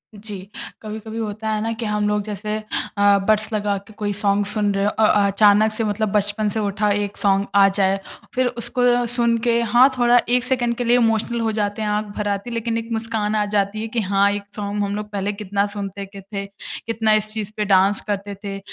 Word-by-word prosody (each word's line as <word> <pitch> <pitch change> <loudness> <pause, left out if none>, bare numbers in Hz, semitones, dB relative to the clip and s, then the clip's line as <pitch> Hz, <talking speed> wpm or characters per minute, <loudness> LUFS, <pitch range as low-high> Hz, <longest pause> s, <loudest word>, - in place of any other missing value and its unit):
जी। 210 -1 -6 0.4
कभी-कभी 220 +1 -7
होता 220 0 -3
है 215 -1 0
ना 225 - -1
कि 230 - -2
हम 210 0 0
लोग 210 0 0
जैसे 210 0 -3 0.4
अ, 205 0 +5
बड्स 215 +1 +2
लगा 205 -1 0
के 220 - -14
कोई 205 -1 -3
सॉन्ग 200 0 +1
सुन 205 0 +1
रहे 195 - +1
हों 210 - +2
अ, 220 - 0
अ, 205 -1 +4
अचानक 205 +2 +4
से 215 +1 -2
मतलब 215 0 -1
बचपन 205 +1 +1
से 220 - -2
उठा 210 0 0
एक 205 0 -1
सॉन्ग 195 0 +2
आ 200 -1 +7
जाए, 195 0 +1 0.4
फ़िर 255 0 +2
उसको 245 0 +1
सुन 235 -1 +2
के 235 0 +3
हाँ, 240 +3 +5
थोड़ा 240 0 +5
1 245 0 +3
सेकंड 245 -2 0
के 245 - -1
लिए 240 +1 +4
इमोशनल 230 0 +1
हो 225 -1 0
जाते 210 0 -2
हैं 215 - -1
आँख 210 +1 0
भर 210 - -2
आती 200 +4 -2
है। - - -6
लेकिन 230 0 -1
एक 230 0 -5
मुस्कान 220 -1 -1
आ 210 - +1
जाती 205 +1 -1
है 225 - -3
कि 230 +1 -2
हाँ, 200 0 +2
एक 205 0 -3
सॉन्ग 205 0 -2
हम 200 0 -2
लोग 210 0 -5
पहले 200 0 -1
कितना 200 -1 -1
सुनते 200 -1 -6
के 195 0 -11
थे। 195 +1 -6 0.4
कितना 225 -1 +2
इस 215 0 +1
चीज़ 215 -2 -4
पे 210 - 0
डाँस 195 0 +3
करते 200 -1 -3
थे। 195 -1 -5
210 Hz, 230 wpm, -21 LUFS, 200-225 Hz, 0.4 s, आ